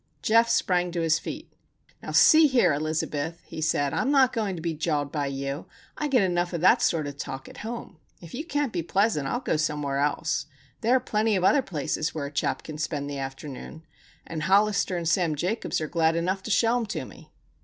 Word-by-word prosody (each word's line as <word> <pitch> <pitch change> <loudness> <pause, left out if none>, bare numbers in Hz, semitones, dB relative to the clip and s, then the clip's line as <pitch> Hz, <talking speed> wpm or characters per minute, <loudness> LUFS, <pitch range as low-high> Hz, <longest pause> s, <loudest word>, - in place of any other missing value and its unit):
Geof 230 +1 +4
sprang 180 -5 +2
to 170 - -1
his 160 -1 +2
feet. - - -8 0.5
"Now - - -8
see 315 0 +7
here, 240 - +3
Elizabeth," 155 +1 -2
he 160 - -7
said, 145 -3 +1
"I'm 265 - 0
not 270 -3 +4
going 210 -5 -1
to - - -6
be 165 -1 -1
jawed 150 -2 -1
by 145 -2 -1
you. 140 +2 -4 0.3
I 300 - -2
get 255 -7 +3
enough 175 -1 0
of 170 - -2
that 225 +7 +5
sort 160 -3 +1
of 145 -1 -6
talk 135 -1 -6
at - - -12
home. 225 -6 -7 0.2
If 170 -2 -12
you 280 - -4
can't 290 -6 -2
be 175 - -1
pleasant, 190 -4 +1
I'll 245 - -2
go 160 - 0
somewhere 150 -2 -1
else. 150 0 0 0.3
There 240 +3 +3
are - - +4
plenty 215 -2 0
of 185 - 0
other 280 +9 +5
places 155 - -3
where 150 -3 -3
a 140 - -6
chap 145 - -1
can 155 -1 -8
spend 145 -2 -3
the 140 - -4
afternoon, 135 +3 -7 0.4
and 160 -2 -5
Hollister 200 +1 +2
and 170 -1 -3
Sam 170 -2 +2
Jacobs 185 +10 -2
are 155 - -3
glad 160 0 +1
enough 185 +3 -1
to 220 - -7
show 225 +4 +3
'em 235 -3 -2
to 210 - -4
me." - - -15
170 Hz, 220 wpm, -26 LUFS, 150-215 Hz, 0.5 s, see